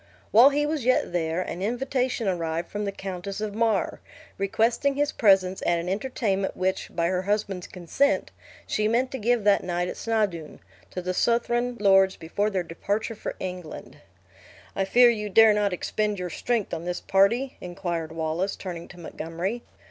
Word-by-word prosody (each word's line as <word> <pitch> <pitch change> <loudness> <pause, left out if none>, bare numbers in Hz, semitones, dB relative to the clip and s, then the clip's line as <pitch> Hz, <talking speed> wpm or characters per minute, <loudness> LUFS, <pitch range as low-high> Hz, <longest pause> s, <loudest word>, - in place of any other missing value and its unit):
While 240 +5 +8
he 290 +1 0
was 300 -3 -2
yet 255 -7 +2
there, 165 +1 0
an 180 - -6
invitation 250 +1 -1
arrived 170 -2 -2
from 205 0 -3
the 200 - -2
Countess 195 0 -6
of 210 -1 -3
Mar, 220 -2 0 0.4
requesting 230 +7 +1
his 290 +1 +1
presence 190 -3 +3
at 175 - +1
an 170 +1 -4
entertainment 195 -1 -1
which, 185 +1 -1
by 170 - +1
her 180 +1 0
husband's 200 -2 -2
consent, 190 - 0 0.3
she 215 0 0
meant 245 +4 +1
to 265 - -4
give 235 0 +1
that 205 -1 +4
night 175 0 -1
at - - -6
Snawdoun, 205 -9 -2 0.3
to 180 - -6
the 185 +1 -2
Southron 240 +3 +1
lords 195 -2 +5
before 200 +6 -1
their 190 -3 -1
departure 200 +7 -3
for 215 - -6
England. 180 -3 -7 0.8
"I 195 - 0
fear 240 +4 +6
you 210 -2 -3
dare 220 +1 +7
not 205 -1 +1
expend 210 +3 -1
your 180 -1 -4
strength 230 +2 -1
on 165 0 -4
this 180 0 -2
party?" 230 +8 +2
inquired 175 -3 -4
Wallace, 165 +4 -2
turning 170 -3 -7
to 175 - -14
Montgomery. 170 +7 -4
195 Hz, 170 wpm, -26 LUFS, 180-230 Hz, 0.8 s, While